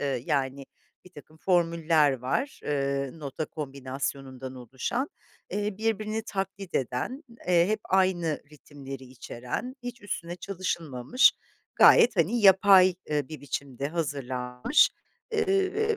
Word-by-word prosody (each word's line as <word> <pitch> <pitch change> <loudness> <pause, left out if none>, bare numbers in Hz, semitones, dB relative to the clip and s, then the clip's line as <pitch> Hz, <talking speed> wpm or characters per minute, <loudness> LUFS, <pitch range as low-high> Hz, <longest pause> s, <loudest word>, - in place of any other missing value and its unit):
ııı, 135 -3 -1
yani, 140 -2 -1 0.4
birtakım 155 -3 -15
formüller 165 -5 +3
var, 135 - -2
ııı, 140 0 -1
nota 140 +2 -4
kombinasyonundan 135 -2 -5
oluşan, 130 - -3 0.4
eee, 205 0 -2
birbirini 220 0 -1
taklit 195 -2 -5
eden, 140 - -2 0.2
eee, 175 -1 +5
hep 215 0 0
aynı 180 -4 +1
ritimleri 135 -2 -10
içeren, 125 - -6
hiç 245 0 -7
üstüne 175 -4 -5
çalışılmamış, 170 - +1 0.4
gayet, 240 - +7
hani, 195 +8 +2
yapay, 190 -1 +7 0.2
ııı, 145 -3 0
bir 155 - -8
biçimde 140 -1 -4
hazırlanmış, 130 - +1 0.4
ııı, 420 +1 +1
160 Hz, 110 wpm, -27 LUFS, 135-200 Hz, 0.4 s, gayet